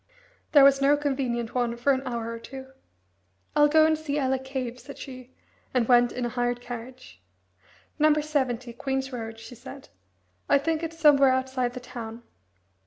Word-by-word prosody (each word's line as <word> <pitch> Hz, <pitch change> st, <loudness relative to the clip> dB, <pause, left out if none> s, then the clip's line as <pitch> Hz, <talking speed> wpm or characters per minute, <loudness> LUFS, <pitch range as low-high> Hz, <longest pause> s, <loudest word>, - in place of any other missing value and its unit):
There 285 Hz, -2 st, +8 dB
was 275 Hz, 0 st, +6 dB
no 285 Hz, +1 st, +4 dB
convenient 260 Hz, -5 st, -2 dB
one 240 Hz, -2 st, -1 dB
for 275 Hz, +4 st, +2 dB
an 260 Hz, -, -1 dB
hour 230 Hz, -2 st, -3 dB
or 230 Hz, -, -6 dB
two. 265 Hz, +2 st, -10 dB, 0.8 s
"I'll 295 Hz, 0 st, +6 dB
go 315 Hz, +1 st, +5 dB
and 315 Hz, 0 st, +3 dB
see 305 Hz, -2 st, -3 dB
Ella 265 Hz, -2 st, +1 dB
Cave," 260 Hz, -2 st, -5 dB
said 280 Hz, +3 st, -11 dB
she, 255 Hz, -2 st, -10 dB, 0.5 s
and 240 Hz, -3 st, +2 dB
went 245 Hz, -1 st, +5 dB
in 250 Hz, -, -3 dB
a -, -, -1 dB
hired 245 Hz, 0 st, -1 dB
carriage. 240 Hz, -, -10 dB, 0.8 s
"No. 305 Hz, +1 st, +5 dB
70, 265 Hz, -6 st, -1 dB
Queen's 265 Hz, +2 st, -3 dB
Road," 225 Hz, -2 st, -6 dB
she 225 Hz, +2 st, -11 dB
said. 260 Hz, +3 st, -11 dB, 0.6 s
"I 285 Hz, -, +6 dB
think 315 Hz, +3 st, -1 dB
it's 330 Hz, 0 st, -5 dB
somewhere 290 Hz, -4 st, +6 dB
outside 260 Hz, -1 st, -1 dB
the 250 Hz, -, -6 dB
town." 235 Hz, -2 st, -8 dB
260 Hz, 175 wpm, -26 LUFS, 240-280 Hz, 0.8 s, There